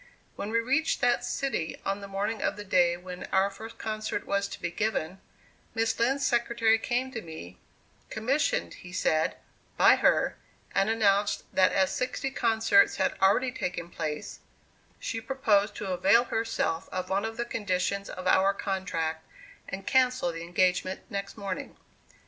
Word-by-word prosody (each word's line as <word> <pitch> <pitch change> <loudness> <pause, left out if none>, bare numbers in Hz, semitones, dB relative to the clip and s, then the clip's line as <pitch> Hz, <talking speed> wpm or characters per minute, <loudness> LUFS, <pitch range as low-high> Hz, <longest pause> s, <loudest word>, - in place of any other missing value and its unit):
When 205 - -4
we 230 +1 +2
reached 270 +7 +1
that 245 -2 +3
city, 270 -12 -2
on 195 +1 -1
the 200 - -7
morning 205 +3 -2
of - - 0
the 205 - -7
day 175 -3 +3
when 180 0 -8
our 195 +1 +2
first 225 +3 -10
concert 215 -1 -3
was 200 0 0
to - - -8
be 170 - -3
given, 190 -3 -2 0.5
Miss 225 -1 0
Lind's 270 +4 +2
secretary 235 -2 +2
came 250 +3 -1
to 225 - -5
me, 125 - -10 0.5
commissioned, 255 +7 0
he 175 - -12
said, 160 -3 +1 0.4
by - - +7
her, - - +2 0.4
and 195 +2 +2
announced 205 -2 +2
that 185 -1 +4
as 190 -1 +2
sixty 255 +1 -2
concerts 230 - +3
had - - 0
already 205 +7 +4
taken 180 -7 -4
place, 150 -1 -4 0.6
she 225 - -3
proposed 215 -5 +1
to 195 -2 -4
avail 195 +6 +5
herself 225 -8 -2
of 185 +1 -4
one 195 +1 +1
of 225 0 -4
the 235 - -1
conditions 200 -3 -1
of 185 - -7
our 190 +2 +4
contract, 165 -5 -2 0.5
and 195 +1 -6
cancel 255 -7 +2
the 165 0 -7
engagement 180 +2 +1
next 200 +1 -4
morning. 195 -3 -5
200 Hz, 160 wpm, -28 LUFS, 185-230 Hz, 0.6 s, by